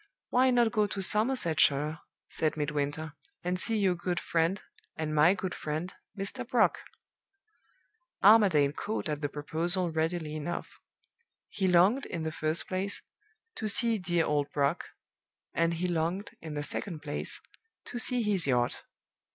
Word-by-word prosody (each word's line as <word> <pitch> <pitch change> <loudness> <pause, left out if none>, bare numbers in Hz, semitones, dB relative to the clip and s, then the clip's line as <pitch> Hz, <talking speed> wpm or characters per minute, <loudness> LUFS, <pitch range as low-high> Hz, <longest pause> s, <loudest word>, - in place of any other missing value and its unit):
'Why 255 +1 +4
not 240 -2 +3
go 210 0 +2
to 200 - -5
Somersetshire,' 170 - +3 0.3
said 155 -1 -1
Midwinter, 150 +1 -2 0.3
'and 180 +1 -1
see 225 +3 +1
your 195 -3 +3
good 175 0 -2
friend, 170 +4 0 0.4
and 155 -1 -3
my 155 +5 +5
good 185 -1 -4
friend, 155 +4 -4 0.2
Mr. 200 +6 -3
Brock?' 240 -1 +2 1.4
"Armadale 190 -9 +6
caught 210 +7 -3
at 150 -1 -3
the 145 - -1
proposal 170 +5 0
readily 160 -1 -1
enough. 155 +3 -5 0.7
He 195 -2 -1
longed, 185 +9 +4
in 165 - -4
the 160 - -2
first 155 +1 -2
place, 190 +2 -2 0.5
to 215 - -4
see 225 +1 +3
'dear 175 -2 +1
old 145 -1 0
Brock,' 145 +3 0 0.7
and 170 0 +1
he 180 +2 -1
longed, 175 +4 -1
in 155 -2 -7
the 145 - -2
second 160 +1 -5
place, 145 -1 -3 0.5
to 240 - -4
see 245 -1 +2
his 195 -7 +2
yacht. 125 -2 +1
175 Hz, 145 wpm, -29 LUFS, 155-200 Hz, 1.4 s, Armadale